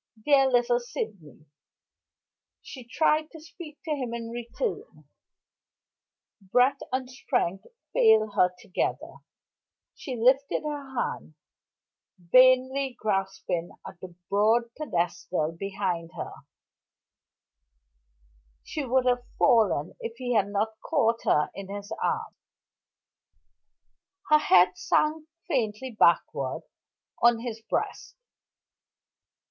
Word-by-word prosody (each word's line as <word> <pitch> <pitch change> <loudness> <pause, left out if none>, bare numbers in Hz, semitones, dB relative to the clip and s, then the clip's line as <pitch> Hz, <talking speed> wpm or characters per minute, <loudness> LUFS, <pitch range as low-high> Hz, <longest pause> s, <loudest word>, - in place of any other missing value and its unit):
"Dear 275 -2 +5
little 245 -1 +2
Sydney!" 200 -11 -7 1.2
She 260 - -10
tried 310 +3 +1
to 320 - -12
speak 310 -1 -11
to 320 - -3
him 255 -5 -2
in 230 -1 -6
return. 320 - -5 1.4
Breath 250 +8 +2
and 260 0 -1
strength 195 -7 -2 0.3
failed 220 -1 +4
her 180 -3 +3
together; 185 - -3 0.8
she 260 -5 -6
lifted 260 +6 +2
her 285 -3 -6
hand, 160 -9 -3 0.8
vainly 255 +7 +4
grasping 195 -4 -2
at 175 - -10
the 180 -2 -10
broad 225 +4 +2
pedestal 175 - -2
behind 185 -3 -3
her; - - -6 2.3
she 300 - -4
would 260 0 +1
have 245 -1 +2
fallen 220 - +3
if 230 0 -6
he 245 -1 -2
had 205 -3 +3
not 215 +2 -2
caught 230 0 +1
her 150 - +2
in 195 -1 -8
his 200 0 -6
arms. 455 -1 -2 1.9
Her 305 - +7
head 180 -9 +5
sank 310 0 +1 0.2
faintly 255 - -1
backward 170 - +1 0.6
on 235 -1 +4
his 230 -2 -6
breast. 225 - -4
235 Hz, 100 wpm, -27 LUFS, 195-265 Hz, 2.3 s, Her